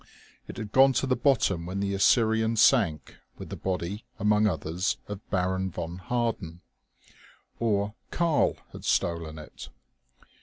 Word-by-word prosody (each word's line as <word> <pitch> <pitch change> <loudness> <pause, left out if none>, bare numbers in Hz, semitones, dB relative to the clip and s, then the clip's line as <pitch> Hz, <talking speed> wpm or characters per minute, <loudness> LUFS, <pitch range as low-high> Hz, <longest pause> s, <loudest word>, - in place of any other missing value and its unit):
It - - -9
had 110 -3 -6
gone 135 +2 +6
to 130 - +1
the 130 -1 +1
bottom 100 - +1
when 95 +2 -3
the 100 0 -1
Assyrian 110 +2 +3
sank 105 - +3 0.2
with - - -9
the - - -5
body 95 +2 -3
among 105 +1 +3
others 85 +1 -1
of 105 -1 -6
Baron 95 0 0
von 85 0 -6
Harden. 100 -5 -2 1.0
Or 105 -2 0 0.2
"Karl" 165 -4 +1
had - - -10
stolen 85 -2 -1
it. 75 - -10
100 Hz, 140 wpm, -27 LUFS, 90-115 Hz, 1.0 s, gone